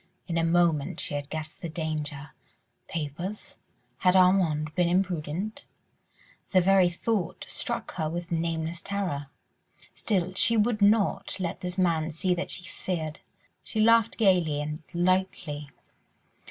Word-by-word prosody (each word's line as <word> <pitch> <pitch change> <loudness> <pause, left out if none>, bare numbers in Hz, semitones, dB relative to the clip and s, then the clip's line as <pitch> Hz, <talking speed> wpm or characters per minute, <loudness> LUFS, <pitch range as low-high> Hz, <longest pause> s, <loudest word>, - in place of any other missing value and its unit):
In 170 - -3
a 165 - +2
moment 165 -3 +2
she - - -3
had 145 0 -3
guessed 155 0 -6
the 170 - -4
danger. 155 -3 -4 0.6
Papers?... 165 +6 -4 0.4
Had 180 0 +4
Armand 175 -5 +3
been 175 0 +2
imprudent?... 180 +2 -1 0.9
The 185 - +7
very 185 0 +5
thought 185 0 -2
struck - - -3
her 155 -3 0
with 175 +2 -5
nameless 165 0 -2
terror. 185 -8 -3 0.7
Still 185 -4 0
she 230 +4 +5
would 215 0 +2
not 205 -1 +3
let 180 0 -3
this 180 0 -4
man 165 -4 +2
see 180 +3 0
that 175 +1 -3
she 180 - -1
feared; 160 -4 -4 0.4
she 220 - -4
laughed 230 0 +4
gaily 180 -8 +3
and 150 +2 -4
lightly. 175 -5 0
175 Hz, 135 wpm, -27 LUFS, 155-190 Hz, 0.9 s, The